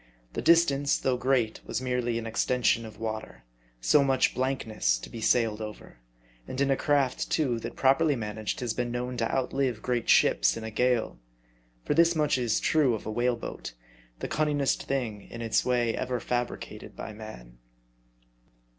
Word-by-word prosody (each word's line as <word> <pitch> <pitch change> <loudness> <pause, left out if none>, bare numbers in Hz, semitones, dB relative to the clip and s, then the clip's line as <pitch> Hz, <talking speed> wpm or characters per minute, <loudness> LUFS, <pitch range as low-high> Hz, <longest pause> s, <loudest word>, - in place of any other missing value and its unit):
The - - -3
dis 170 +1 +6
tance, 140 -1 +1
though 130 - 0
great, 125 -3 0
was - - -3
merely 125 -2 -1
an 115 - -4
extension 115 0 +1
of 110 -1 -13
water; 110 - -5 0.4
so 140 - +4
much 135 -2 +2
biankness 110 - 0
to - - -10
be 115 - -7
sailed 110 -2 +2
over; 105 - -9 0.5
and 130 - -5
in 140 0 +2
a - - +4
craft, 140 -2 +1
too, 130 -7 +1
that - - -7
properly 135 +3 +3
managed 110 -1 -4
has 120 -3 -1
been 120 +1 -2
known 125 +1 -3
to 115 -1 0
outlive 130 -3 -1
great 120 -2 -1
ships - - +4
in 115 - -6
a 110 - -5
gale. 120 - 0 0.7
For - - +1
this 170 +2 +4
much 150 -4 +2
is 120 -3 +1
true 145 -7 +3
of 110 - -8
a 110 - -3
whale 120 +2 +1
boat, - - -7 0.5
the - - -2
cun 155 0 0
ningest 145 -3 0
thing 115 -7 -3
in 115 0 -7
its 115 - +2
way 120 -2 +1
ever 125 -1 -2
fabricated 120 +1 -4
by 110 - -7
man. - - -11
125 Hz, 180 wpm, -28 LUFS, 110-135 Hz, 0.7 s, dis